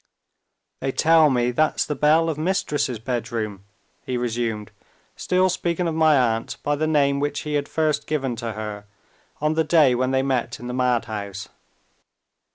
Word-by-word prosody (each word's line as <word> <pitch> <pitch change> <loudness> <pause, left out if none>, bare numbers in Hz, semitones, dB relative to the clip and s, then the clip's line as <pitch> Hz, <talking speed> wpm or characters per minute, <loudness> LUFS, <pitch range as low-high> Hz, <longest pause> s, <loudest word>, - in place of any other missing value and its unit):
"They 135 - -2
tell 160 +1 +4
me 125 -2 +1
that's 155 +5 +1
the 150 - -2
bell 155 +3 +3
of 160 - -1
Mistress's 150 -6 -1
bedroom," 110 -4 -4 0.4
he 125 - -3
resumed, 115 -3 -2 0.4
still 185 +1 +1
speaking 175 -1 -1
of 165 - -1
my 155 -2 +4
aunt 115 -3 0
by 145 - +1
the 155 +2 -1
name 140 -2 +2
which 145 +1 -2
he 150 - -5
had 145 -1 -1
first 155 -2 0
given 135 -5 -1
to 115 -1 -4
her 105 -1 -6 0.6
on 150 +1 +1
the 160 0 +2
day 155 -4 +4
when 130 +1 0
they 130 0 +1
met 130 -3 -1
in 120 - -9
the 125 - -4
madhouse. 110 -6 -2
135 Hz, 165 wpm, -23 LUFS, 120-155 Hz, 0.6 s, tell